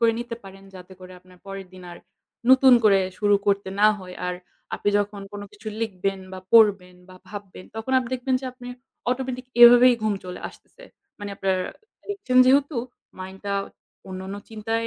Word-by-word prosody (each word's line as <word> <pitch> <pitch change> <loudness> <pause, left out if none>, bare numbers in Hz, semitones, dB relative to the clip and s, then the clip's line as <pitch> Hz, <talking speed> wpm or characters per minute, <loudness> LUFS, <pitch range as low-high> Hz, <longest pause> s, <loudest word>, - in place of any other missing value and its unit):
করে 230 -1 +4
নিতে 240 -1 -5
পারেন 195 0 -13
যাতে 180 0 -12
করে 185 0 -12
আপনার 180 0 -20
পরের 195 -1 -7
দিন 185 - -12
আর 175 - -11 0.5
নতুন 260 0 +7
করে 195 -2 +5 0.2
শুরু 205 -1 +3
করতে 200 -1 +1
না 210 - +7
হয়। 180 -1 -10
আর 180 - -2 0.4
আপনি - - -2
যখন 205 0 -3
কোনো 205 0 -7
কিছু 215 +1 -9
লিখবেন 195 -2 -2
বা 185 - -7
পড়বেন 200 -5 +4
বা 185 - -14
ভাববেন 200 -2 -10
তখন 225 +4 -4
আপনি 245 -2 -4
দেখবেন 255 +1 -1
যে - - -9
আপনি 250 -1 -11 0.4
automatic 255 0 -3 0.2
এভাবেই 245 +1 +9
ঘুম 215 -1 +1
চলে 180 0 -8
আসতেছে। - - -18 0.3
মানে 205 0 -6
আপনার 190 -1 0 0.5
লিখছেন 395 -11 -2
যেহেতু 280 +2 +3 0.4
mind 190 +1 -8
টা 200 0 -2 0.5
অন্যান্য 190 +1 -6
চিন্তায় 225 +1 -2
205 Hz, 175 wpm, -24 LUFS, 190-245 Hz, 0.5 s, এভাবেই